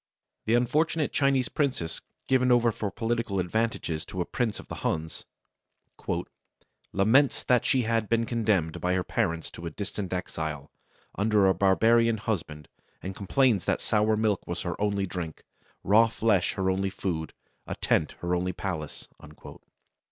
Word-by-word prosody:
The 110 - +3
unfortunate 150 +6 +1
Chinese 135 -3 +2
princess 125 - -2 0.3
given 125 -1 +3
over 120 -1 +4
for 105 -1 -3
political 115 -1 -1
advantages 90 -4 -1
to 95 - -7
a 90 - 0
prince 115 +1 -2
of - - -11
the - - -7
Huns, 80 0 -3 1.6
"laments 115 +9 +3
that 125 -1 +2
she 130 -3 +2
had 115 -1 0
been 115 0 +2
condemned 105 -9 0
by 90 +1 +1
her 90 - 0
parents 85 -8 -1
to 85 - -7
a - - -2
distant 100 +2 -5
exile, 80 -5 -4 0.4
under 105 -1 +2
a 95 - +5
barbarian 115 +4 +3
husband, 80 -9 -4 0.4
and 95 0 -5
complains 105 0 +2
that - - +1
sour 110 0 +2
milk 105 -3 0
was 85 0 -3
her 85 -2 -3
only 100 -1 +1
drink, 90 -4 -6 0.4
raw 110 +4 +5
flesh 110 -4 +1
her 95 0 0
only 95 +1 0
food, 85 -5 -4 0.3
a - - -4
tent - - +1
her 85 +1 -1
only 90 +1 0
palace." 80 -5 -5
100 Hz, 150 wpm, -27 LUFS, 90-115 Hz, 1.6 s, a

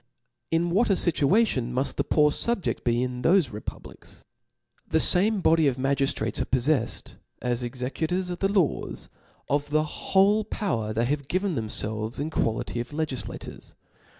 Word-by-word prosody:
Ill 165 +1 +1
what 205 +8 +2
a - - +5
fituation 165 - +2
muft 130 +3 -1
the - - 0
poor 150 -1 +3
fubjcd 235 +4 -2
be, 120 +1 +1
under 125 +3 -1
thofe 170 - +2
republics! 105 - -9 0.6
The - - +2
fame 200 +3 +4
body 160 -3 +4
of 130 -2 0
ma 135 +1 0
gtftrates 135 -5 0
are - - 0
pofiefled, 130 -1 -1 0.2
as 125 0 -1
executors 150 +9 -2
of 175 - -5
the 195 0 +1
laws, 190 -7 -1 0.4
of 145 +1 0
the 155 +1 +2
whole 195 +6 +2
power 120 - -2
they 115 +2 0
have 140 +1 -2
given 185 +2 0
themielves 110 -1 -1
HI 150 +2 -2
quality 115 -2 -1
of 120 - -4
legiflators. 150 -4 -6
145 Hz, 155 wpm, -26 LUFS, 125-180 Hz, 0.6 s, a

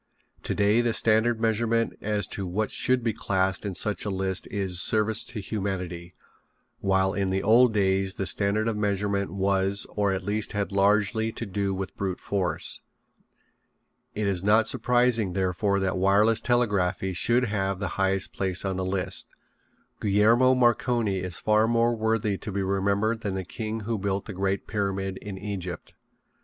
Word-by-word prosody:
Today 105 +3 +2
the 120 -1 0
standard 115 +2 +3
of 110 - -12
measurement 115 +1 +1
as 105 -2 -1
to 95 -2 -4
what 105 +4 -2
should 125 -1 +1
be 115 -2 0
classed 95 0 -1
in 95 - -4
such 105 -1 0
a 105 - -2
list 95 -1 -2
is 95 -3 +2
service 110 0 +3
to 115 - -7
humanity, 90 -4 -4 0.6
while 95 0 +1
in 100 -2 -1
the 95 +1 -1
old 120 +3 +5
days 95 -2 +1
the 95 - -3
standard 100 +3 +1
of 115 - -1
measurement 100 -1 -1
was 100 0 0
or 100 -1 0
at 95 0 -2
least 105 +3 -2
had 100 -1 -2
largely 105 +3 +2
to 115 - -5
do 100 0 -2
with 95 -1 -5
brute 95 -2 -3
force. 95 -3 -1 1.3
It 105 - -1
is 95 -2 0
not 110 +2 +4
surprising, 120 -5 +2
therefore, 95 +2 0
that 95 -1 -1
wireless 105 +4 +3
telegraphy 100 -6 0
should 120 +7 +2
have 100 -3 -2
the 100 - -2
highest 95 0 0
place 95 0 -1
on 95 -1 -2
the 95 - -2
list. 95 0 -2 0.7
Guglielmo 115 +6 +4
Marconi 120 -4 +1
is 90 -2 -4
far 110 +1 +2
more 115 0 +2
worthy 110 -2 0
to 105 - -6
be 100 0 -2
remembered 100 +4 0
than 100 -3 -3
the 95 - -3
king 110 +3 -5
who 110 0 -3
built 100 0 -2
the 105 - -7
great 95 +1 -2
Pyramid 95 -2 -2
in 100 -2 -8
Egypt. 95 -3 -6
100 Hz, 170 wpm, -26 LUFS, 95-110 Hz, 1.3 s, old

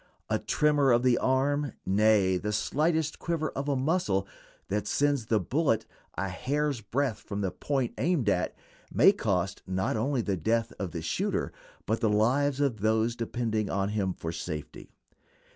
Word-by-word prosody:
A - - +2
tremor 145 -3 +2
of 120 +1 +4
the 125 -2 +4
arm, 140 +1 +1
nay, 100 -1 +3
the 105 +3 -3
slightest 155 +8 0
quiver 165 -2 -1
of 140 +1 -3
a 140 - +2
muscle, 130 - 0 0.4
that 105 +1 -2
sends 140 -5 +1
the 110 -2 +3
bullet 140 -4 +1 0.3
a 100 - -2
hair's 140 +6 -1
breadth 115 +2 -1
from 100 0 -5
the 95 -2 -1
point 130 +6 -2
aimed 165 - +1
at, 90 -3 +1 0.4
may 145 - +6
cost 100 - -1
not 95 +2 -1
only 125 +3 0
the 100 -2 0
death 115 +6 0
of 95 - -2
the 85 -2 -6
shooter, - - -1 0.3
but 110 +2 0
the 110 - +3
lives 130 +7 +2
of 135 -7 +1
those 110 +2 +1
depending 115 -3 -2
on 100 +1 0
him 100 -3 -1
for 80 - -4
safety. 80 -2 -6
115 Hz, 165 wpm, -28 LUFS, 100-140 Hz, 0.4 s, may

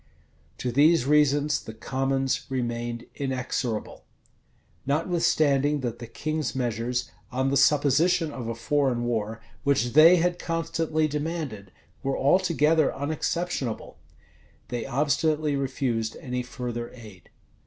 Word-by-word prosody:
[] - - -35
To 125 - -2
these 150 +3 +4
reasons 145 0 +3
the 110 - -9
commons 135 +2 -1
remained 120 -2 -3
inexorable. 130 -4 -3 0.8
Notwithstanding 150 -2 +2
that 120 -2 -4
the 120 - -7
king's 155 +4 -3
measures, 120 -1 -2 0.2
on 130 +2 0
the - - +1
supposition 150 +4 +3
of 125 -5 -6
a 115 - -3
foreign 130 0 0
war, 115 -2 -2 0.2
which 130 -4 +1
they 160 +4 +8
had 175 0 +1
constantly 165 -2 -1
demanded, 150 - -4 0.3
were 135 0 -1
altogether 160 -1 +3
unexceptionable, 150 -3 -3 0.7
they 120 +1 -3
obstinately 150 +2 +1
refused 130 -5 -2
any 125 -1 -3
further 120 -1 -5
aid. 105 -7 -14
135 Hz, 115 wpm, -26 LUFS, 120-155 Hz, 0.8 s, they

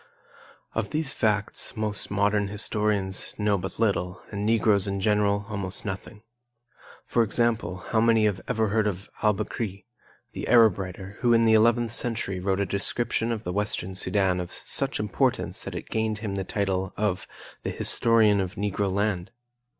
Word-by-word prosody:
Of 110 -2 -2
these 155 -2 -2
facts 105 -1 0
most 105 -2 0
modern 100 0 +1
historians 105 -1 -1
know 105 -1 +2
but 95 0 -5
little 95 -5 0
and 100 -1 -3
Negroes 105 -3 +3
in 100 0 -2
general 105 0 +1
almost 100 -4 -5
nothing. 105 +2 -6 0.8
For 120 - +1
example, 110 -5 0
how 110 - +3
many 115 -1 +4
have 100 -3 0
ever 110 -1 +1
heard 110 +1 +2
of 100 -1 -5
Al 105 -2 +3
Bekri, 105 -1 -4 0.5
the - - -6
Arab 115 -5 +5
writer, 95 +1 -7
who 120 -1 +3
in 115 0 +4
the 110 - +5
eleventh 115 +1 +4
century 115 -6 0
wrote 95 +1 0
a 100 - +1
description 115 +4 -1
of 110 -1 -3
the 90 - -3
Western 100 -2 -2
Sudan 95 -1 +1
of 90 -1 -4 0.2
such - - +1
importance - - -1
that - - -6
it - - -6
gained 110 -1 0
him 105 -2 -4
the 95 -1 -2
title 95 -1 -2
of 105 -3 -1 0.3
"The - - -3
Historian 110 -3 +3
of 95 0 -4
Negro 100 -1 -1
Land"? 100 -2 -1
105 Hz, 165 wpm, -26 LUFS, 95-110 Hz, 0.8 s, Arab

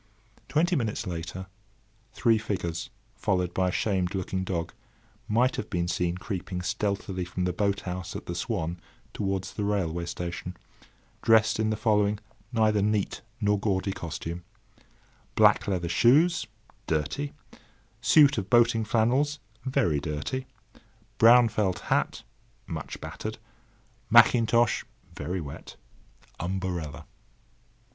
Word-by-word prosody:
Twenty 175 +4 +2
minutes 115 -4 -1
later, 90 +1 -5 0.7
three 115 -2 +3
figures, 85 -6 -3 0.2
followed 90 -3 0
by 90 -1 +1
a - - -1
shamed 95 -1 0
looking 95 0 -2
dog, 85 -3 -3 0.5
might 125 +4 +2
have 105 - -4
been 85 -2 -1
seen 90 0 -1
creeping 90 -2 -4
stealthily 95 0 -2
from 90 +1 -3
the 90 - 0
boat 100 +1 0
house 90 0 -5
at - - -6
the 85 - -4
"Swan" 85 -3 -2 0.3
towards 95 -2 -2
the 105 - -3
railway 85 -5 -1
station, 90 +1 -5 0.6
dressed 110 -1 +4
in 110 0 +1
the 110 - -1
following 105 -2 +2 0.3
neither 110 -3 +3
neat 105 0 0 0.2
nor 105 -2 +2
gaudy 95 -1 0
costume: 85 -1 -5 0.9
Black - - +5
leather 90 -4 -1
shoes, 150 - +4 0.4
dirty; 80 - -1 0.7
suit 140 +2 +6
of 95 -1 -6
boating 115 -1 +4
flannels, 125 +7 +2 0.3
very 130 - +1
dirty; 75 - -3 0.7
brown 120 +1 +8
felt 100 -5 0 0.2
hat, - - 0 0.4
much 80 -6 -6
battered; - - -6 0.7
mackintosh, 115 -1 +5 0.3
very 90 +2 -3
wet; 70 -4 -8 0.6
umbrella. 85 -5 -3
100 Hz, 120 wpm, -27 LUFS, 90-110 Hz, 0.9 s, brown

